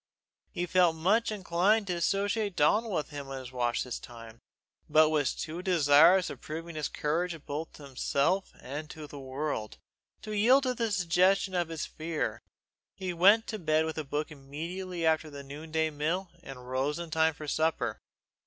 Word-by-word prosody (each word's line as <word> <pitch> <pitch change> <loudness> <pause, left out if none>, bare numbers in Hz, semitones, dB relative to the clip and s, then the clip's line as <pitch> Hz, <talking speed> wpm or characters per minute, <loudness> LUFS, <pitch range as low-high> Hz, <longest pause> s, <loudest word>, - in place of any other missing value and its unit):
He 175 - -3
felt 180 -2 +3
much 205 +8 +2
inclined 200 +2 +2
to 185 - -2
associate 200 +3 0
Donal 210 +10 +3
with 170 -7 -2
him 140 -2 -7
in 135 - -5
his 130 -1 -8
watch 120 -2 0
this 125 - -5
time, 115 -1 -12 0.5
but 155 0 +5
was 150 -3 +1
too 165 +3 -5
desirous 170 +1 +5
of - - -10
proving 165 +2 -6
his 155 -2 -3
courage 165 +1 -2
both 150 +3 -5
to 150 - -13
himself 140 +7 0
and 150 +3 -6
to 155 -1 -8
the 145 -1 -10
world, 135 -4 -4 0.5
to 215 - -6
yield 250 +7 +5
to 255 -1 +1
the 230 -2 -1
suggestion 185 +1 +2
of 175 -2 0
his 165 -2 -3
fear. 160 0 -3 0.5
He 185 -2 -4
went 200 +6 +5
to 215 - -4
bed 155 -2 +2
with 160 0 -3
a - - -2
book 150 +2 -3
immediately 165 +5 -5
after 160 -1 +2
the 140 -1 -9
noon 145 +4 -9
day 160 0 0
meal 165 +5 -2
and 125 -6 -10
rose 135 +4 -1
in 170 -2 -6
time 160 0 +2
for 150 - -8
supper. 160 +2 0
160 Hz, 180 wpm, -30 LUFS, 145-185 Hz, 0.5 s, but